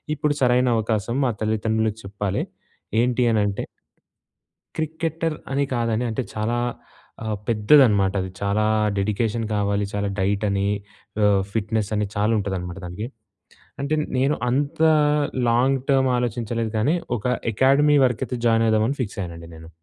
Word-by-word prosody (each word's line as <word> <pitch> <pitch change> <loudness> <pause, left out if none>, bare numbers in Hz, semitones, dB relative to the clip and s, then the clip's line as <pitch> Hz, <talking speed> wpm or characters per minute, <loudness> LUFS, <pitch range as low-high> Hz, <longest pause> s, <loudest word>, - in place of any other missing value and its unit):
ఇప్పుడు 150 0 0
సరైన 125 0 +3
అవకాశం 110 +2 -1
మా 120 - +2
తల్లిదండ్రులకి 110 0 0
చెప్పాలి. 100 0 -2 0.6
ఏంటీ 125 0 +1
అనంటే... 105 -3 0 1.1
క్రికెటర్ 160 0 -2 0.2
అని 140 +1 +1
కాదని, 115 0 0
అంటే 120 +4 -2
చాలా 110 +2 -1 0.7
ఆహ్, 110 -1 -2
పెద్దదనమాట 105 -4 +5
అది. 95 - -5
చాలా 100 +2 +1 0.3
డెడికేషన్ 110 +3 0
కావాలి. 100 0 0
చాలా 100 0 -1
డైట్ 100 +2 0
అని, 100 0 0 0.6
ఆహ్, 100 -2 +4
ఫిట్‍నెస్ 110 -1 -1
అని 105 -1 0
చాలా 105 +2 +2
ఉంటుందనమాట 95 -2 -4
దానికి. 100 +6 -5 0.7
అంటే 140 +2 0 0.2
నేను 135 +3 +2
అంతా 145 +5 +2 0.6
లాంగ్ 130 +3 +2
టర్మ్ 135 -1 +3
ఆలోచించలేదు 115 -1 -2
కానీ. 140 +10 +2 0.2
ఒక - - -14 0.3
అకాడమీ 140 +5 +4
వరకైతే 125 0 -1
జాయిన్ 115 0 +4
అవుదామని 110 +5 +1
ఫిక్స్ 105 -1 -6
అయ్యానండి 85 -2 -7
నేను. 80 0 -12
110 Hz, 130 wpm, -23 LUFS, 100-130 Hz, 1.1 s, పెద్దదనమాట